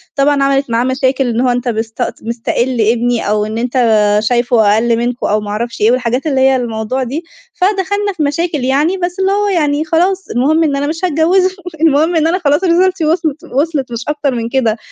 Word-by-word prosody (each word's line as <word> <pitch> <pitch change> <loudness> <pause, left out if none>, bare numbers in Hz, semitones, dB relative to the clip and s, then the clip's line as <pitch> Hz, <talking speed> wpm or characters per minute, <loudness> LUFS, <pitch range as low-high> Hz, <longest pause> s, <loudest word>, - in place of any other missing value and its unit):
طبعًا 280 0 +2
عَمَلِت 275 -1 +1
معاه 230 +1 +1
مشاكل، 260 +1 0
إن 235 0 -1
هو 255 - +2
أنت 245 0 -1
مست 225 -1 -3 0.2
مستَقِل 235 +2 -2
ابني 235 +1 +1
أو 210 0 +1
إن 215 +1 -5
أنت 245 +2 -3 0.5
شايفه 235 -2 +2
أقَل 230 +1 +1
منكم 240 +1 -2
أو 210 - +1
ما 210 - -7
أعرفش 230 +3 -4
إيه 215 +2 +4
والحاجات 250 +3 -1
اللي 270 -3 +1
هي 265 0 +4
الموضوع 240 +1 -2
دي. 275 +7 -4 0.3
فدخلنا 405 +1 0
في 310 - 0
مشاكل 300 0 -1
يعني 290 +8 +1
بس 360 0 -3
اللي 385 0 +1
هو 410 +1 +1
يعني 305 -5 0
خلاص 365 +4 0
المهم 305 +7 +2
إن 295 -3 0
أنا 280 +1 -1
مش 325 +4 -2
هاتجوّزه، 360 +3 +2 0.3
المهم 320 +2 +3
إن 320 -1 +2
أنا 355 +3 0
خلاص 295 +1 +1
رسالتي 360 -1 +2
وِصلِت 315 -2 -1
وِصلِت 280 -2 -2
مش 235 0 -4
أكتر 290 -3 -1
من 230 -1 -3
كده. 235 -4 0
275 Hz, 200 wpm, -14 LUFS, 240-325 Hz, 0.5 s, إيه